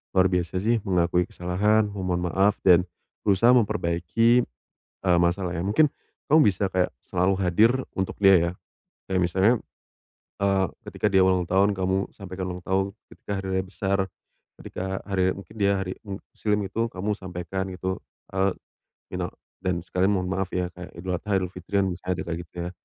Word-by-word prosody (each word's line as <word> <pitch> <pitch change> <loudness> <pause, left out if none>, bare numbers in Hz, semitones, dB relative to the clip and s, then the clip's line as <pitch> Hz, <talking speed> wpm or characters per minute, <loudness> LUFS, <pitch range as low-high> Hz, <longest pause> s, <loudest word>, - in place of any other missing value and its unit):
luar 95 0 +6
biasa, 90 0 0
sih. 115 +3 +2
Mengakui 90 -1 +2
kesalahan, 105 +5 +1
memohon 90 -3 -2
maaf, 100 +3 +2
dan 90 -1 +6 0.4
berusaha 105 +4 +5
memperbaiki, 110 +2 +2 0.6
eee, 90 -1 +5
masalahnya. 85 0 0
Mungkin, 140 +9 +4 0.4
kamu 155 +2 +7
bisa 100 -1 +1
kayak 95 -1 0
selalu 90 +2 +1
hadir 95 +6 +4 0.2
untuk 95 0 -2
dia, 95 -1 +8
ya. - - -8 0.6
Kayak 95 -1 +1
misalnya, 95 +6 +3 0.9
eee, 95 -1 +3 0.2
ketika - - -1
dia 95 -1 +5
ulang 95 -1 +3
tahun 95 +3 +3
kamu 95 +1 0
sampaikan 95 -2 -6
ulang 90 0 -6
tahun, 95 +1 +1 0.2
ketika - - -8
hari - - -6
raya 95 - -1
besar 100 +1 -1 0.6
ketika 95 +1 -4
hari 95 -1 +2
mungkin 100 +1 -12
dia 100 -1 +3
hari 95 -1 -4
muslim 105 +1 -2
gitu, 115 +3 -1
kamu 100 +3 -2
sampaikan, 95 +1 -4
gitu. 95 +1 -3 0.3
Eee, 95 0 +1 0.6
minal - - -3 0.3
dan 95 -2 0
sekalian 90 +2 0
mohon 95 -2 0
maaf 95 0 -2
ya, 90 -1 -1
kayak 90 0 -9
Idul 90 +1 -3
Adha, 100 +2 0
Idul 95 -1 -2
Fitri, 90 +3 -2
kan 95 - +2
bisa 90 -1 -5
aja 90 - 0
kayak 85 -1 -3
gitu, - - -31
ya. - - -4
95 Hz, 170 wpm, -25 LUFS, 90-100 Hz, 0.9 s, dia